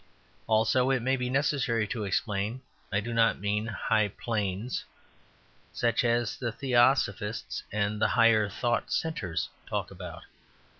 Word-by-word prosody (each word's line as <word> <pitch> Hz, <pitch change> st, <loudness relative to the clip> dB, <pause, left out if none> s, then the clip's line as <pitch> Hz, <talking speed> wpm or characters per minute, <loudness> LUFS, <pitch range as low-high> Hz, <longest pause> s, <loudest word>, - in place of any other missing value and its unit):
Also 110 Hz, +3 st, +3 dB
(it 130 Hz, -3 st, +1 dB
may 130 Hz, +2 st, +2 dB
be 125 Hz, -1 st, -2 dB
necessary 130 Hz, -4 st, +1 dB
to 105 Hz, 0 st, -3 dB
explain) 105 Hz, +5 st, -1 dB, 0.3 s
I 100 Hz, -, +1 dB
do 120 Hz, +2 st, -4 dB
not 115 Hz, 0 st, +3 dB
mean 105 Hz, +2 st, -1 dB
"high 110 Hz, 0 st, +1 dB
planes" 105 Hz, +1 st, -3 dB, 0.9 s
such 120 Hz, 0 st, +1 dB
as 120 Hz, +1 st, +1 dB
the 120 Hz, -3 st, -2 dB
Theosophists 120 Hz, -4 st, +1 dB
and 105 Hz, 0 st, -1 dB
the -, -, +5 dB
Higher 110 Hz, -3 st, +5 dB
Thought 120 Hz, +4 st, -1 dB
Centres 100 Hz, -, -2 dB, 0.2 s
talk -, -, -3 dB
about. -, -, -8 dB
115 Hz, 135 wpm, -29 LUFS, 105-125 Hz, 0.9 s, the